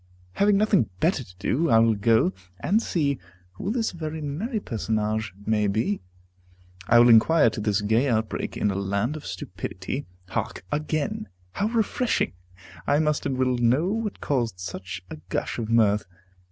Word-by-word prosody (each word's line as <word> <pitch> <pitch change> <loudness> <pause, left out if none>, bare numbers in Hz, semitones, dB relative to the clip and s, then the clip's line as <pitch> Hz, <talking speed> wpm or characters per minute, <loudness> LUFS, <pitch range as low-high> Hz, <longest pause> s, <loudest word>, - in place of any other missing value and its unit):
Having 200 - +3
nothing 200 - +3
better 160 - +1
to 90 -5 -17
do, 135 - 0
I 115 - +6
will 115 0 +5
go 105 -2 +3 0.3
and 210 +5 +2
see 145 - 0 0.3
who 140 - -4
this 225 0 0
very 160 -2 -5
merry 175 - -3
personage 110 - -2
may 105 -1 +2
be. 110 - 0 0.9
I 120 - +6
will 120 +1 +8
inquire 120 +8 +6
into 110 -2 +1
this 105 -1 +1
gay 110 +6 +2
outbreak, 110 -3 -1
in 105 - +1
a - - -3
land 100 +8 -1
of 155 - -8
stupidity. 95 +10 -5 0.2
Hark, 90 - -3
again! 150 -6 -2 0.2
how 205 - -1
refreshing! 230 - 0 0.5
I 145 - +4
must 150 -1 +1
and 130 - -2
will 130 -1 +1
know 130 +9 +3
what 220 -1 -3
caused 120 -9 -1
such 90 +1 -6
a - - -6
gush 100 - -2
of 110 -1 -3
mirth. 105 -3 +3
120 Hz, 165 wpm, -25 LUFS, 105-160 Hz, 0.9 s, will